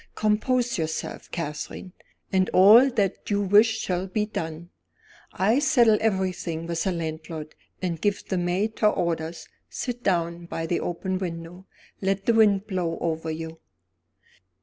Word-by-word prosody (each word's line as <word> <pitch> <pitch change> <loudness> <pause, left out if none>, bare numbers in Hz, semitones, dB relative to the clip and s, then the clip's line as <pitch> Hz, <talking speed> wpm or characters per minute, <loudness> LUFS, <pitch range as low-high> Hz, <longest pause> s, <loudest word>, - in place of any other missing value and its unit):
"Compose 235 +2 +1
yourself, 160 0 -4
Catherine, 165 +3 -5 0.4
and 190 0 +3
all 215 +8 +8
that 210 -7 -1
you 205 -1 +1
wish 215 +3 +5
shall 180 -1 -2
be 210 +3 -1
done. 165 -4 -6 0.6
I'll 220 +9 +2
settle 240 -6 +4
everything 185 -6 -1
with 170 -1 -2
the 190 - +1
landlord, 160 -2 -5 0.3
and 170 -3 -2
give 205 -1 0
the 185 - -1
maid 185 +5 -1
her 215 - +5
orders. 165 -3 -2 0.2
Sit 245 -2 -4
down 170 -4 -1
by 165 -1 -4
the 170 +1 0
open 185 +2 -3
window; 175 +1 -6 0.3
let 195 0 -1
the 235 - +3
wind 210 -3 +4
blow 180 -5 -2
over 160 -1 -2
you." 160 0 -6
185 Hz, 145 wpm, -25 LUFS, 165-210 Hz, 0.6 s, all